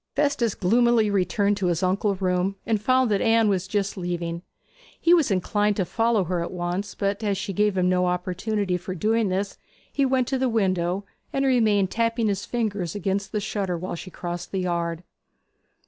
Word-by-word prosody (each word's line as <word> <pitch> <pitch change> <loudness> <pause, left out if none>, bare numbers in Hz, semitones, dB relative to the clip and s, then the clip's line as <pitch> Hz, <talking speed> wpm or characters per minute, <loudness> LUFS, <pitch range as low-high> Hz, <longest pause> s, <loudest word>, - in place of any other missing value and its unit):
Festus 280 -7 +1
gloomily 225 +2 +3
returned 200 +1 +1
to 190 - 0
his 175 0 0
uncle's 195 +1 0
room 185 +1 +1
and 220 -2 0
found 255 +1 +3
that 200 - +2
Anne 225 -1 +4
was 190 -2 0
just 200 0 -1
leaving. 175 -2 -3 0.6
He 335 - +4
was 325 -7 +4
inclined 205 +2 +1
to 190 - 0
follow 225 +2 +1
her 180 0 -2
at 170 - -3
once, 180 +3 -3
but 200 +2 -1
as 200 -2 0
she 200 0 -4
gave 205 0 +1
him 180 -1 +2
no 180 0 +2
opportunity 185 +2 -1
for 185 +1 -6
doing 220 +3 +1
this 195 +2 -2 0.3
he 280 - +1
went 260 -2 +2
to 265 -1 0
the 260 -1 +1
window, 190 -3 0 0.3
and 275 0 0
remained 215 -7 +3
tapping 230 -1 +1
his 200 0 -2
fingers 205 -8 -2
against 200 0 -2
the 210 - -1
shutter 200 -4 -2
while 185 +3 -5
she 175 +2 -7
crossed 175 -1 -6
the 190 - -1
yard. 170 -1 -2
200 Hz, 190 wpm, -25 LUFS, 180-220 Hz, 0.6 s, Anne